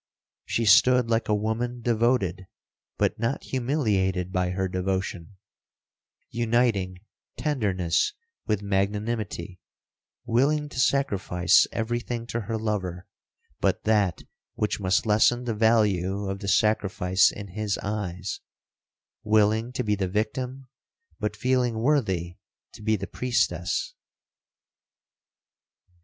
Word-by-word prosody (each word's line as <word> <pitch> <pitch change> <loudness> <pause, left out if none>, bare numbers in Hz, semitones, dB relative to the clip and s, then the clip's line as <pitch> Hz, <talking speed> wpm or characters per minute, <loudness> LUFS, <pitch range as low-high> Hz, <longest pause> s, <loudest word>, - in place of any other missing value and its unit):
She 115 - -1
stood 125 +2 +5
like 115 0 +1
a 105 - +3
woman 115 +3 -2
devoted, 115 -6 +1 0.5
but - - 0
not 115 +5 -1
humiliated 105 - 0
by 90 -1 0
her 95 +1 -1
devotion—uniting 95 +3 -3 0.4
tenderness 100 - 0 0.3
with 105 -2 0
magnanimity—willing 110 +6 -2
to 130 - -6
sacrifice 100 - +3
every 120 +1 -1
thing 120 -1 -5
to 120 - 0
her 110 +2 -3
lover, 95 -5 -3 0.5
but - - 0
that 105 -6 +1 0.3
which 105 - -1
must 95 +2 +1
lessen 110 +3 +3
the 120 -2 -2
value 105 -3 +2
of 95 0 -3
the 100 - -6
sacrifice 95 -2 +3
in 100 -1 -8
his 105 +1 -2
eyes—willing 105 +3 -2
to 125 - -2
be 105 -2 +1
the 95 -2 -1
victim, 125 +6 -3 0.5
but 105 -1 -2
feeling 125 0 +1
worthy 100 - 0 0.4
to - - -12
be 110 +1 +1
the 100 -1 -4
priestess. 95 -7 -1
105 Hz, 105 wpm, -26 LUFS, 95-120 Hz, 0.5 s, stood